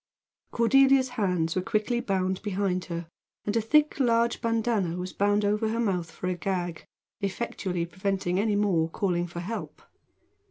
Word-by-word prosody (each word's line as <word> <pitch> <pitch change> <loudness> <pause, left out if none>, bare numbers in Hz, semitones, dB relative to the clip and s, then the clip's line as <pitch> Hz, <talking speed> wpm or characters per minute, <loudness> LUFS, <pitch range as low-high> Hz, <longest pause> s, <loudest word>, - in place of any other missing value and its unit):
Cordelia's 265 +2 +4
hands 180 -8 0
were 185 - +1
quickly 215 +4 0
bound 190 -4 -1
behind 195 -3 -1
her, 170 -1 -5 0.4
and 210 - -1
a 230 - +3
thick 300 +7 +3
large 235 -2 +2
bandanna 225 -6 0
was 180 +1 -5
bound 205 +1 +2
over 210 +2 +1
her 230 +1 -1
mouth 180 -7 0
for 175 - -8
a 185 - +1
gag, 175 -2 -3 0.3
effectually 195 -3 -2
preventing 185 +1 -1
any 210 0 +1
more 185 -6 +2
calling 175 -1 -1
for 170 0 -6
help. 220 +6 -6
200 Hz, 155 wpm, -27 LUFS, 180-230 Hz, 0.4 s, Cordelia's